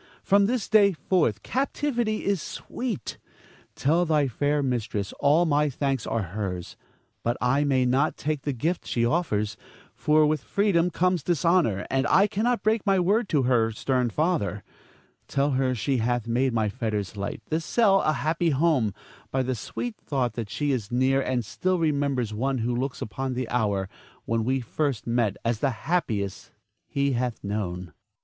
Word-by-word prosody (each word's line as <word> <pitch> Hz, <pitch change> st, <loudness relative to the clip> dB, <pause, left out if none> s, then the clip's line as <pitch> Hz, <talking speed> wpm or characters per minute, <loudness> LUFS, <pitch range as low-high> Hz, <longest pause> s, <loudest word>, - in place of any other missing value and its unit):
From 200 Hz, 0 st, +4 dB
this 240 Hz, -1 st, -1 dB
day 205 Hz, -2 st, +5 dB
forth 155 Hz, -, 0 dB
captivity 245 Hz, -5 st, -1 dB
is 200 Hz, -4 st, +1 dB
sweet. 230 Hz, -, -5 dB, 0.6 s
Tell 165 Hz, +5 st, +2 dB
thy 155 Hz, -4 st, +2 dB
fair 145 Hz, +4 st, 0 dB
mistress 115 Hz, -6 st, -2 dB
all 155 Hz, +5 st, +4 dB
my 150 Hz, -1 st, +2 dB
thanks 135 Hz, -2 st, -2 dB
are 115 Hz, -2 st, -1 dB
hers; 95 Hz, -4 st, -4 dB, 0.5 s
but 120 Hz, +1 st, -1 dB
I 130 Hz, +4 st, +2 dB
may 130 Hz, -3 st, +2 dB
not 135 Hz, +5 st, +1 dB
take 150 Hz, -1 st, -2 dB
the 145 Hz, -, -2 dB
gift 160 Hz, +8 st, -2 dB
she 120 Hz, -1 st, +1 dB
offers, 115 Hz, -8 st, 0 dB, 0.4 s
for 155 Hz, 0 st, +3 dB
with 150 Hz, -1 st, +1 dB
freedom 180 Hz, 0 st, +2 dB
comes 180 Hz, 0 st, +1 dB
dishonor, 165 Hz, -, +2 dB
and 135 Hz, 0 st, +1 dB
I 195 Hz, -, +5 dB
cannot 230 Hz, +4 st, 0 dB
break 215 Hz, 0 st, +2 dB
my 195 Hz, -2 st, +3 dB
word 205 Hz, +5 st, +2 dB
to 145 Hz, -4 st, +2 dB
her 120 Hz, -3 st, +3 dB
stern 125 Hz, +2 st, 0 dB
father. 130 Hz, -, -1 dB, 0.6 s
Tell 140 Hz, +1 st, +1 dB
her 130 Hz, -1 st, +1 dB
she 130 Hz, +4 st, 0 dB
hath 120 Hz, 0 st, 0 dB
made 125 Hz, +3 st, +1 dB
my 110 Hz, -2 st, +1 dB
fetters 105 Hz, -3 st, -3 dB
light, 100 Hz, 0 st, -5 dB
this 160 Hz, +1 st, 0 dB
cell 195 Hz, 0 st, +3 dB
a 155 Hz, -, +2 dB
happy 160 Hz, +3 st, 0 dB
home, 140 Hz, -, +2 dB, 0.3 s
by 130 Hz, 0 st, 0 dB
the 130 Hz, 0 st, -1 dB
sweet 215 Hz, -, -5 dB
thought 130 Hz, -6 st, -2 dB
that 115 Hz, -3 st, -5 dB
she 145 Hz, +4 st, -1 dB
is 115 Hz, -5 st, -2 dB
near 130 Hz, +2 st, +2 dB
and 125 Hz, -3 st, -1 dB
still 185 Hz, -, -1 dB
remembers 140 Hz, -8 st, 0 dB
one 130 Hz, +5 st, -1 dB
who 120 Hz, +1 st, -1 dB
looks 130 Hz, +2 st, -3 dB
upon 130 Hz, +4 st, -4 dB
the 125 Hz, -1 st, -2 dB
hour 100 Hz, -5 st, 0 dB, 0.4 s
when 115 Hz, +4 st, 0 dB
first 135 Hz, -1 st, -2 dB
we 115 Hz, -, -3 dB
met 115 Hz, -5 st, +1 dB
as 115 Hz, -2 st, 0 dB
the 140 Hz, -, +2 dB, 0.2 s
happiest 110 Hz, -, -1 dB, 0.4 s
he 140 Hz, 0 st, 0 dB
hath 125 Hz, -2 st, -2 dB
known. 100 Hz, -3 st, -3 dB
Zara. 85 Hz, -4 st, -14 dB
135 Hz, 170 wpm, -26 LUFS, 115-165 Hz, 0.6 s, day